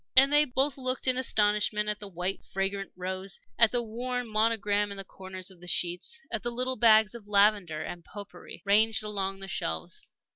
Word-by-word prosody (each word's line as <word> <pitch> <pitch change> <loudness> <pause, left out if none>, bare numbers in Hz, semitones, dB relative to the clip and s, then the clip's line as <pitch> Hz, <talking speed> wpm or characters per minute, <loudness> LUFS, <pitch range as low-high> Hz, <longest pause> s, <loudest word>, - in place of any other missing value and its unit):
And 270 +2 +6
they 295 +1 +6
both 270 +1 0
looked 255 0 -1
in 255 - +5
astonishment 210 -3 +1
at 210 0 -1
the 205 - -7
white, 180 +1 -3
fragrant 195 +1 -3
rows, 185 +1 -4 0.2
at 230 -2 +6
the 245 -1 0
worn 245 +2 -4
monogram 215 -2 +1
in 200 - -6
the 195 - -5
corners 190 0 -6
of 180 -2 -18
the 180 - -10
sheets, 180 - 0
at 225 -2 -2
the 240 - 0
little 255 +2 0
bags 220 -3 +5
of 230 -3 -11
lavender 200 -6 +2
and 175 -1 -7
pot 205 +2 -10
pourri - - -12
ranged 215 +2 +4
along 195 -2 -2
the 195 - -6
shelves. 80 - -4
210 Hz, 195 wpm, -28 LUFS, 195-235 Hz, 0.2 s, And